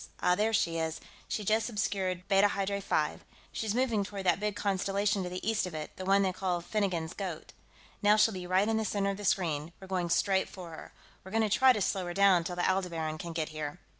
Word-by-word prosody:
Ah, 180 Hz, -, +3 dB
there 215 Hz, +4 st, +1 dB
she 165 Hz, -6 st, +1 dB
is; 160 Hz, 0 st, -2 dB, 0.3 s
she 210 Hz, -, -3 dB
just 220 Hz, +3 st, +2 dB
obscured 190 Hz, -4 st, -2 dB
Beta 195 Hz, +1 st, +5 dB
Hydrae 200 Hz, 0 st, -2 dB
V; 155 Hz, -5 st, 0 dB, 0.3 s
she's 220 Hz, -1 st, -2 dB
moving 235 Hz, -5 st, +1 dB
toward 195 Hz, 0 st, -6 dB
that 180 Hz, -1 st, +3 dB
big 210 Hz, 0 st, -1 dB
constellation 200 Hz, +1 st, 0 dB
to 180 Hz, -, -3 dB
the 180 Hz, +3 st, -5 dB
east 220 Hz, -4 st, +1 dB
of 175 Hz, -, -7 dB
it, 155 Hz, -1 st, -6 dB
the 185 Hz, -, -6 dB
one 195 Hz, +1 st, +4 dB
they 190 Hz, -1 st, 0 dB
call 180 Hz, -2 st, -1 dB
Finnegan's 175 Hz, -3 st, -2 dB
Goat. 180 Hz, -6 st, -6 dB, 0.5 s
Now 210 Hz, 0 st, +5 dB
she'll 215 Hz, +1 st, +4 dB
be 180 Hz, -1 st, -6 dB
right 185 Hz, +3 st, +3 dB
in 220 Hz, 0 st, +1 dB
the 220 Hz, -, 0 dB
center 200 Hz, -2 st, 0 dB
of 195 Hz, -, -5 dB
the 205 Hz, -, -6 dB
screen; 165 Hz, -4 st, 0 dB
we're 190 Hz, -, -10 dB
going 185 Hz, -2 st, -2 dB
straight 190 Hz, +2 st, +2 dB
for 180 Hz, -3 st, -9 dB
her. 160 Hz, -, -10 dB, 0.3 s
We're 190 Hz, -, -10 dB
going 220 Hz, +2 st, +2 dB
to 205 Hz, -, +2 dB
try 260 Hz, 0 st, +6 dB
to 215 Hz, -, 0 dB
slow 190 Hz, -1 st, -1 dB
her 175 Hz, -, -5 dB
down 195 Hz, -3 st, +5 dB
till 175 Hz, +1 st, -4 dB
the 175 Hz, -, +1 dB
Aldebaran 170 Hz, -5 st, -1 dB
can 170 Hz, -, -5 dB
get 160 Hz, -1 st, -2 dB
here...." 155 Hz, +1 st, -5 dB
190 Hz, 240 wpm, -30 LUFS, 175-205 Hz, 0.5 s, try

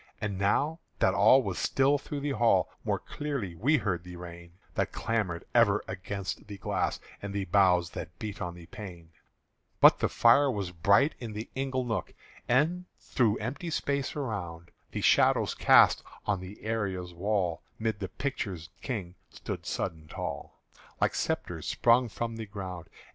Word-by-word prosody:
And 100 Hz, -3 st, -3 dB
now 145 Hz, -, +1 dB, 0.2 s
that -, -, +3 dB
all 130 Hz, 0 st, +6 dB
was 95 Hz, -5 st, -3 dB
still 140 Hz, +2 st, +3 dB
through 145 Hz, 0 st, -5 dB
the 145 Hz, 0 st, -1 dB
hall, 120 Hz, -3 st, +3 dB
More -, -, 0 dB
clearly 140 Hz, -, -4 dB
we 135 Hz, -, +3 dB
heard 90 Hz, -, -1 dB
the 90 Hz, 0 st, -9 dB
rain 85 Hz, 0 st, -10 dB, 0.2 s
That -, -, -1 dB
clamoured 105 Hz, -7 st, -2 dB
ever 105 Hz, -4 st, +4 dB
against 95 Hz, +1 st, -5 dB
the 100 Hz, -1 st, -7 dB
glass -, -, -1 dB, 0.2 s
And 100 Hz, 0 st, -5 dB
the 100 Hz, -1 st, -1 dB
boughs 90 Hz, -2 st, +3 dB
that 85 Hz, +1 st, -7 dB
beat 105 Hz, -2 st, -6 dB
on 85 Hz, 0 st, -4 dB
the 85 Hz, -1 st, -11 dB
pane 85 Hz, -4 st, -10 dB, 0.7 s
But -, -, +8 dB
the -, -, +1 dB
fire 135 Hz, +5 st, +5 dB
was 100 Hz, -7 st, -2 dB
bright 100 Hz, -, +4 dB
in 115 Hz, -3 st, -6 dB
the 110 Hz, +2 st, -6 dB
ingle 130 Hz, -1 st, -1 dB
nook, 115 Hz, -7 st, -3 dB, 0.3 s
And 160 Hz, +9 st, +2 dB
through 110 Hz, -4 st, +1 dB
empty 140 Hz, +10 st, -4 dB
space 140 Hz, -3 st, -1 dB
around 90 Hz, -, -4 dB, 0.2 s
The -, -, -4 dB
shadows -, -, +4 dB
cast -, -, +6 dB, 0.2 s
on 100 Hz, -2 st, 0 dB
the 95 Hz, +3 st, -10 dB
arras'd 95 Hz, -6 st, -2 dB
wall 90 Hz, -2 st, 0 dB, 0.2 s
'Mid 110 Hz, -2 st, -1 dB
the 95 Hz, -3 st, -4 dB
pictured 95 Hz, -, -4 dB
kings 100 Hz, -9 st, -4 dB, 0.2 s
stood -, -, -6 dB
sudden 80 Hz, -, -2 dB
and 80 Hz, 0 st, -18 dB
tall -, -, -6 dB, 0.4 s
Like -, -, +2 dB
spectres -, -, -2 dB
sprung 120 Hz, +1 st, +3 dB
from 115 Hz, +1 st, -4 dB
the 110 Hz, -1 st, -6 dB
ground. 95 Hz, -4 st, -7 dB
105 Hz, 165 wpm, -29 LUFS, 90-125 Hz, 0.7 s, But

